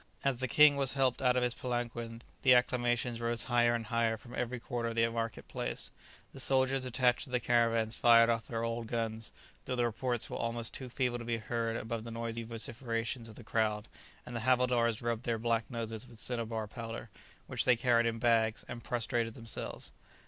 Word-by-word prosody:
As 135 -3 +1
the 130 - 0
king 145 +2 +6
as 135 -1 +1
helped 135 -2 +1
out 125 -1 +4
of 125 - +2
his 120 -1 +1
palanquin, 120 -2 -4 0.2
the 130 -1 +7
acclamations 120 -1 +1
rose 115 -1 0
higher 120 -1 +3
and 115 -1 -3
higher 115 0 +1
from 120 +3 -13
every 125 0 -2
quarter 115 0 -3
of 115 - -5
the 115 0 +4
market 115 -1 -3
place - - -2 0.4
The 135 - -8
soldiers 130 0 +2
attached 125 0 +2
to - - -13
the 125 0 +1
caravans 115 -1 +2
fired 115 -1 +7
off 115 -1 0
their 115 -1 -2
old 115 0 -2
guns, 115 -1 -2 0.3
though 130 - -2
the 120 -1 +2
reports 120 +1 -1
were - - -5
almost 115 0 -3
too 130 -2 -5
feeble 125 -1 -1
to - - -6
be 115 0 -1
heard 115 0 -2
above 115 -1 -4
the 115 - -7
noisy 115 0 -3
vociferations 115 0 -3
of 110 - -11
the 120 - -11
crowd; 105 -1 0 0.4
and 125 - -7
the - - -1
havildars 120 -2 +2
rubbed 115 -1 -1
their 115 -1 0
black 115 0 0
noses 115 -1 -4
with 120 -2 -14
cinnabar 115 -2 -1
powder, 115 +1 -7 0.3
which - - 0
they 125 - +6
carried 120 -1 +3
in 115 -1 -1
bags, 115 -2 +2
and 120 -1 -7
prostrated 120 -1 -1
themselves. 115 -3 -6
115 Hz, 200 wpm, -32 LUFS, 115-125 Hz, 0.4 s, the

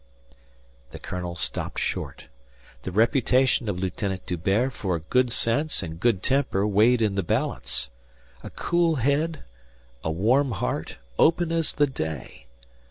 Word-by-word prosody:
The - - -9
colonel 90 -1 -5
stopped 80 - -3
short. - - -3 0.6
The 95 - -5
reputation 125 +2 +2
of 95 - -2
Lieutenant 95 0 -3
D'Hubert 95 +9 0
for 95 -6 -2
good 125 +10 +1
sense 120 +4 +2
and 80 -1 -7
good 110 -3 +1
temper 130 -7 +1
weighed 110 +4 +4
in 105 -2 +1
the 100 - 0
balance. 85 - -1 0.5
A - - -8
cool 170 -2 +1
head, 145 +5 0 0.6
a - - -1
warm 120 - +2
heart, 100 - -3 0.2
open 165 +1 +3
as 165 -2 +1
the 145 - +3
day. 80 - -6
110 Hz, 135 wpm, -25 LUFS, 90-135 Hz, 0.6 s, weighed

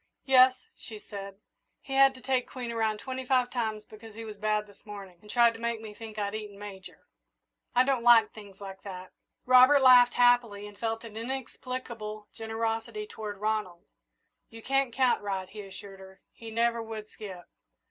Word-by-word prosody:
"Yes," 255 -1 +5
she 220 - -9
said. 200 -2 -9 0.5
"He 270 - -7
had 270 0 +5
to 255 - -13
take 260 -1 0
Queen 245 -2 -5
around 220 -2 0
twenty 260 +3 -5
five 250 -1 +1
times 220 -3 -2
because 215 0 -13
he 225 0 -7
was 210 -2 -9
bad 215 0 0
this 205 -1 -20
morning 200 -4 -10
and 210 - -16
tried 235 0 +4
to 225 - -11
make 235 -1 -2
me 220 -1 -9
think 220 0 -10
I'd 200 -1 -2
eaten 210 -2 -6
Major. 200 -2 -10 0.7
I 250 - +6
don't 265 -2 +1
like 235 -2 +6
things 200 -3 -13
like 195 -1 -9
that." 185 -2 -9 0.3
Robert 255 +2 +7
laughed 245 -1 +7
happily 245 -4 +3
and 205 0 -11
felt 225 +2 -3
an 225 -2 -10
inexplicable 235 -3 -6
generosity 225 - -3
toward 215 - -7
Ronald. 210 -4 -2 0.6
"You 225 -1 -12
didn't 270 -2 +1
count 260 -1 +2
right," 195 -2 -3
he 210 +2 -9
assured 195 0 -11
her. 190 0 -14
"He 230 - -10
never 230 +1 +1
would 220 -1 -7
skip." 190 -5 -10
225 Hz, 180 wpm, -29 LUFS, 205-245 Hz, 0.7 s, Robert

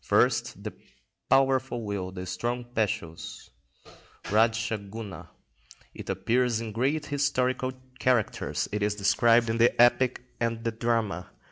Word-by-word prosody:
First, - - +2
the - - -5 0.6
powerful 130 -3 +2
will, 100 -3 -3
the 90 -1 -6
strong 120 +7 -3
passions 90 -7 -3 0.8
(Radscha 110 -1 +1
Guna). 100 -6 -8 0.6
It - - -9
appears 120 -1 +1
in 115 -1 -5
great 135 +8 0
historical 130 -3 0 0.3
characters; 125 -4 +1
it 105 0 -2
is 105 0 +1
described 115 +3 +4
in 115 +1 -1
the 120 +1 +4
epic 120 +1 +4 0.2
and 115 -1 -1
the 115 - 0
drama. 110 -5 -1
115 Hz, 125 wpm, -28 LUFS, 105-125 Hz, 0.8 s, described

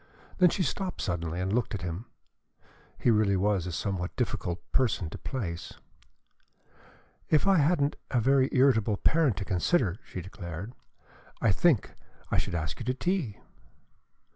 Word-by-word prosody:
Then 180 -1 +7
she 185 - 0
stopped 185 +6 -3
suddenly 85 -1 -2
and 95 +2 -1
looked 120 -2 0
at 95 - -5
him. 90 +5 -4 0.9
He 120 - +3
really 105 -3 +3
was 95 -2 +1
a - - -3
somewhat 90 0 -3
difficult 85 -1 -2
person 110 -10 +1
to - - -6
place. 90 -11 -4 1.6
"If 155 - +4
I 195 -1 +5
hadn't 145 -1 +2
a 125 - +2
very 135 +2 +3
irritable 115 -6 +3
parent 150 - +2
to 100 - -3
consider," 95 - +1
she - - -7
declared, 90 +3 -7 0.7
"I 110 - +3
think 135 - +2 0.4
I - - +3
should - - -3
ask 80 -2 -3
you 120 - -5
to 125 +1 0
tea." 170 - -2
105 Hz, 150 wpm, -29 LUFS, 90-140 Hz, 1.6 s, Then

